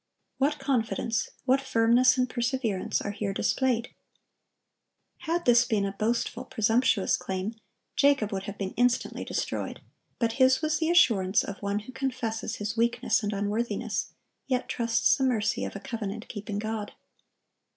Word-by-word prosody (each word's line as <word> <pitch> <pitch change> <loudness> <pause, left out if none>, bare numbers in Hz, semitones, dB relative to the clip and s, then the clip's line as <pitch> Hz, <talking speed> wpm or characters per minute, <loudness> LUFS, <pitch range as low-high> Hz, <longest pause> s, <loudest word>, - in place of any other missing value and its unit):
What 290 +2 +2
confidence, 230 -4 -1 0.2
what 265 +1 +3
firmness 250 +1 +4
and 255 0 +2
perseverance, 240 -5 -1
are 200 - -2
here 205 -1 -3
displayed! 245 -1 0 1.3
Had 340 +1 -2
this 240 -1 +6
been 215 -4 0
a 195 - -2
boastful, 220 +4 -1
presumptuous 225 -2 +2
claim, 190 +4 -3 0.4
Jacob 280 -7 +3
would 195 -1 -3
have 200 - -6
been 195 -1 -4
instantly 245 0 +1
destroyed; - - -3 0.4
but 230 -2 +1
his 260 0 +6
was 310 -1 +1
the 320 0 +1
assurance 220 - +4
of 200 - -7
one 200 +1 -1
who 220 - -11
confesses 255 -4 -3
his 210 +1 -4
weakness 235 +1 +1
and 210 -1 -2
unworthiness, 210 +2 -2 0.3
yet 255 -2 0
trusts 230 -1 +2
the 270 - -1
mercy 235 -5 +1
of - - -6
a - - -4
covenant 215 0 -5
keeping 205 -1 -5
God. 215 0 -4
230 Hz, 150 wpm, -28 LUFS, 205-255 Hz, 1.3 s, this